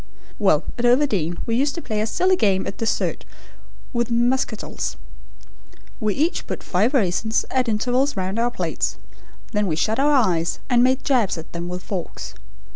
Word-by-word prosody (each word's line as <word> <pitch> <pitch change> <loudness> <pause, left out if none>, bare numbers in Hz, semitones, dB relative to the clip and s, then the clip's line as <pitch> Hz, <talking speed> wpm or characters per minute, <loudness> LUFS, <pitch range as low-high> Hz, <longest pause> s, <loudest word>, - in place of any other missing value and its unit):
"Well, 180 -7 +3 0.2
at 240 - +1
Overdene 240 - +2
we 230 - 0
used 280 +5 +1
to 335 - -4
play 215 -1 -1
a 215 - 0
silly 370 +10 +2
game 195 - +2
at 195 - -6
dessert 225 -1 -1 0.7
with 235 -1 0
muscatels. 240 -1 0 1.0
We 210 -2 0
each 320 +5 0
put - - -5
five 215 +10 +1
raisins 220 0 +1
at 255 -2 +1
intervals 250 +4 +1
round 190 +3 -1
our 240 +1 +2
plates, 240 - -2 0.5
then 210 -2 +1
we 160 - 0
shut 215 +10 0
our 290 +2 +4
eyes 180 - +2
and 240 0 +5
made 260 +1 +2
jabs 245 - +2
at 160 - -9
them 170 +1 -4
with 180 +1 -5
forks. 185 -4 -5
225 Hz, 170 wpm, -22 LUFS, 190-255 Hz, 1.0 s, and